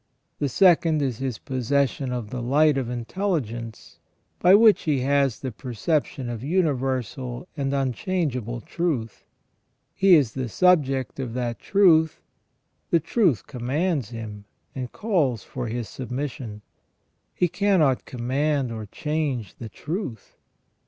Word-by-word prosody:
The 145 - 0
second 165 0 +4
is 125 -5 -2
his 130 -3 -3
posses 135 +1 0
sion 135 -3 -5
of 120 -4 -4
the 125 - -4
light 145 +5 +3
of 130 -3 -2
intelligence, 120 - -4 0.4
by 180 +2 +7
which 220 0 +5
he 145 -5 +1
has 140 -2 +2
the 130 - -3
perception 130 +3 -2
of 120 -1 -5
universal 130 - -1
and 140 -3 -1
unchangeable 130 - -1
truth. 135 - -3 0.7
He 190 -2 +6
is 140 -8 +3
the 130 -3 -3
subject 135 - +2
of 125 -3 -4
that 120 -2 -2
truth; 165 -6 +4 0.7
the 170 - +4
truth 165 - +1
commands 135 - -1
him, 110 -3 -8 0.3
and 125 -2 -5
calls 155 - 0
for 125 -2 -5
his 115 0 -3
submission; 125 -4 -5 0.7
he 180 - +2
cannot 175 -8 +2
command 130 +2 -1
or 110 -2 -6
change 145 - -2
the 115 - -7
truth. 145 - -6
135 Hz, 130 wpm, -24 LUFS, 120-155 Hz, 0.7 s, by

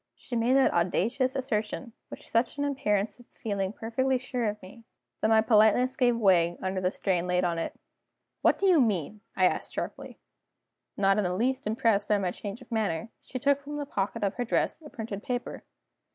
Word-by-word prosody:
She 245 - -7
made 235 +3 +2
that 270 - +4
audacious 230 +10 +1
assertion 235 -2 -2 0.2
with - - -9
such 230 +5 0
an 285 - 0
appearance 225 -7 0
of 245 - -17
feeling 200 -3 -3
perfectly 255 +4 0
sure 250 -1 -3
of 210 0 -5
me, 210 +5 -13 0.4
that - - +2
my 220 0 +5
politeness 220 +3 +4
gave 245 -2 +3
way 175 -5 +3
under 190 0 -2
the 180 - +2
strain 180 -2 -1
laid 180 0 +1
on 170 -2 0
it. - - -5 0.6
"What - - +4
do 395 - 0
you 360 -6 +6
mean?" 210 - 0
I 185 - +4
asked - - 0
sharply. - - -5 0.8
Not 195 +1 +3
in - - +1
the 180 -1 -1
least 255 +4 0
impressed 220 -3 +1
by 210 - +3
my 185 -3 -1
change 205 +6 -7
of 240 - -23
manner, 220 -1 -1
she 255 - -7
took 280 +2 +2
from 295 +1 -6
the 290 - -3
pocket 200 -6 -2
of 195 - +1
her 245 - 0
dress 245 - 0
a 300 - -11
printed 220 -6 -6
paper. 245 +1 -4
220 Hz, 200 wpm, -28 LUFS, 195-255 Hz, 0.8 s, you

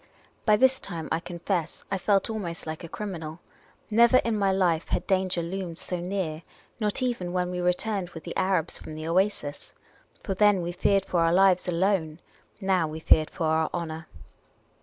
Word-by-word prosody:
By 210 -1 +6
this 260 +2 +4
time, 165 -4 -6
I - - +1
confess, 170 -1 -3
I 195 - 0
felt 195 +1 +2
almost 190 -7 -4
like 155 +2 -5
a 170 - -7
criminal. 165 -6 -6 0.5
Never 235 +3 +6
in 230 -1 +1
my 200 -2 +2
life 175 -4 +1
had 180 - -1
danger 185 -2 +1
loomed 175 -1 -4
so 180 -1 -4
near 175 -3 -3 0.2
— - - -34
not 215 +4 0
even 210 -9 -2
when 180 -1 0
we 180 - -3
returned 180 +1 0
with 165 -2 -10
the 170 - -6
Arabs 185 -3 0
from 155 - -9
the 155 +1 -5
oasis. 175 -5 -1 0.5
For 195 - -2
then 205 -2 +4
we 170 - -2
feared 195 +2 +2
for 175 - 0
our 165 0 +3
lives 185 0 +4
alone; 175 -3 0 0.4
now, 190 -5 +2
we 155 +1 -6
feared 155 -1 +4
for 165 - -3
our 160 0 +2
honour. 160 -1 -5
180 Hz, 185 wpm, -27 LUFS, 165-195 Hz, 0.5 s, By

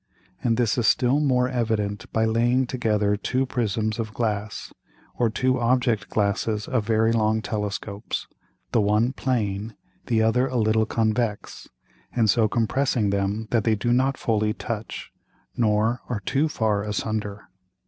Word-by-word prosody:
And 115 -3 +2
this 120 0 +1
is 115 - +2
still 130 +3 +3
more 125 -4 +2
evident 110 -5 -2
by 110 0 +2
laying 120 +3 +2
together 105 -5 0
two 130 +5 -1
Prisms 110 -3 -1
of 110 -2 -4
Glass, 105 -2 -3 0.4
or 120 -2 +1
two 130 +3 +1
Object 120 -3 +1
glasses 105 0 0
of 120 -5 -1
very 110 0 +3
long 110 -1 +2
Telescopes, 105 0 -4 0.5
the 115 - +3
one 105 +5 +2
plane, 110 -5 -2 0.3
the 115 -3 +2
other 125 +4 +2
a 130 -1 -2
little 110 -1 +2
convex, 110 -1 -1 0.5
and 110 -4 +4
so 110 +2 +3
compressing 115 -1 +1
them 100 +2 -1
that 115 -3 +2
they 110 -1 +2
do 120 +4 0
not 130 +2 +2
fully 105 -1 0
touch, 115 -2 -5 0.4
nor 110 +1 +1
are 115 -4 -2
too 150 +7 +1
far 110 -7 0
asunder. 105 -1 -3
110 Hz, 150 wpm, -24 LUFS, 105-120 Hz, 0.5 s, and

